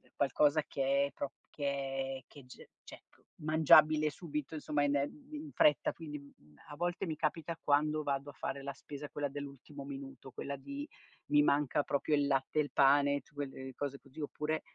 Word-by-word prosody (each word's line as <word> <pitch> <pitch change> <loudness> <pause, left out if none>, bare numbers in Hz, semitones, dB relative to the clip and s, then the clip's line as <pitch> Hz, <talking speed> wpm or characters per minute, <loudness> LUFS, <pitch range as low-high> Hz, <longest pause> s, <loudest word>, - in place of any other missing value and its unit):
qualcosa 145 +2 +3
che 140 +1 +2
è - - -11
pro 140 -1 -4 0.2
che 135 -2 -2
è - - -21
che 140 -3 -14
g 125 - -13 0.2
cioè - - -11
c - - -27 0.2
mangiabile 155 0 +6
subito 150 -1 -5
insomma 150 -1 0
in, 145 0 +2
ehm, 265 - -2
in 300 0 -6
fretta. 150 -1 +4
Quindi, 150 -3 -7
mhmm, 75 - -19
a 145 - -7
volte 175 +3 -1
mi 160 -2 -2
capita, 165 +1 -1
quando 150 +1 +2
vado 140 0 -1
a - - -22
fare 140 0 -4
la 140 0 -4
spesa 145 +1 -8
quella 145 -1 -2
dell'ultimo 140 0 -8
minuto, 135 -2 -8
quella 140 +2 -4
di: 280 - -6 0.4
mi 295 0 +5
manca 145 - +2
proprio 145 +2 +1
il 145 - +2
latte, 135 +2 +1
il 145 - 0
pane 140 0 +5
tu 145 +2 -27
quelle 135 -2 -5
cose 140 -1 -3
così 135 +2 -14
oppure 150 +2 -2
145 Hz, 185 wpm, -34 LUFS, 140-155 Hz, 0.4 s, mangiabile